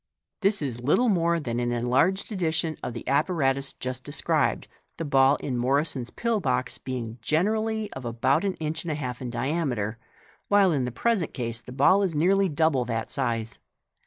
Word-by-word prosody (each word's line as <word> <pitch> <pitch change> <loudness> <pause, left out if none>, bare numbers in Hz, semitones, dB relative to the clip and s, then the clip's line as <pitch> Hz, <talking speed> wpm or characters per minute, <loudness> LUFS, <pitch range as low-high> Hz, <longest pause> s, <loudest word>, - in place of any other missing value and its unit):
— - - -60
T*ais 200 -4 +2
is 120 -4 -4
little 195 - +3
more 170 -3 +2
than 120 -5 -3
an 120 0 0
enlarged 130 - +1
edition 160 -4 -1
of 120 - -5
the 115 - -7
apparatus 140 -2 +1
just 130 0 -5
described, 145 0 0 0.3
the 165 - -3
ball 135 -1 +4
in 135 -3 -4
Morison's 130 0 0
pill 235 -2 -1
box 130 -8 -1
being 120 -3 -5
generally 215 - 0
of 130 - -7
about 130 - +1
an 195 -2 -1
inch 160 0 -3
and 170 - -5
a - - -1
half 125 -4 -5
in 125 - -4
diameter, 120 -4 -2 0.5
while 200 -2 +5
in 135 -5 0
the 125 - -3
present 200 - 0
case 115 -2 -3
the 125 - -11
ball 145 +10 +4
is 185 -5 0
nearly 190 +5 +3
double 155 -4 +2
that 115 -2 -3
size. 115 -4 -2
140 Hz, 185 wpm, -26 LUFS, 125-170 Hz, 0.5 s, while